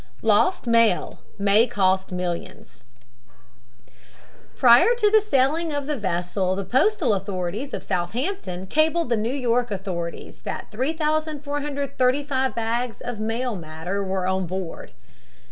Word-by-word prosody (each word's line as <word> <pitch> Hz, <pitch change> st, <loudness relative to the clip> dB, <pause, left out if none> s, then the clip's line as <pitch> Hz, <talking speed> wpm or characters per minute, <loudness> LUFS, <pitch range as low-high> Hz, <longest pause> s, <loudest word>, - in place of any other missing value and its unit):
LOST 370 Hz, -6 st, +3 dB
MAIL 230 Hz, -5 st, +2 dB, 0.2 s
MAY 205 Hz, +4 st, +4 dB
COST 190 Hz, -4 st, +1 dB
MILLIONS 180 Hz, -8 st, -5 dB, 1.7 s
Prior 250 Hz, -, +6 dB
to 425 Hz, -3 st, +2 dB
the 435 Hz, 0 st, +6 dB
sailing 320 Hz, -3 st, +1 dB
of 285 Hz, -1 st, -2 dB
the 300 Hz, +1 st, -1 dB
vessel 185 Hz, -2 st, -1 dB
the 195 Hz, 0 st, -4 dB
postal 265 Hz, -, +2 dB
authorities 195 Hz, +6 st, -3 dB
of -, -, -5 dB
Southampton 190 Hz, -, -3 dB
cabled 315 Hz, -, +1 dB
the 235 Hz, -, +3 dB
New 220 Hz, +1 st, -1 dB
York 245 Hz, -2 st, 0 dB
authorities 185 Hz, -4 st, -5 dB
that -, -, -6 dB
3435 285 Hz, -2 st, -1 dB
bags 230 Hz, +1 st, -2 dB
of 245 Hz, -3 st, -5 dB
mail 225 Hz, +2 st, -2 dB
matter 170 Hz, +4 st, -4 dB
were 190 Hz, -1 st, -2 dB
on 190 Hz, -1 st, 0 dB
board. 185 Hz, -1 st, -6 dB
230 Hz, 120 wpm, -24 LUFS, 190-285 Hz, 1.7 s, Prior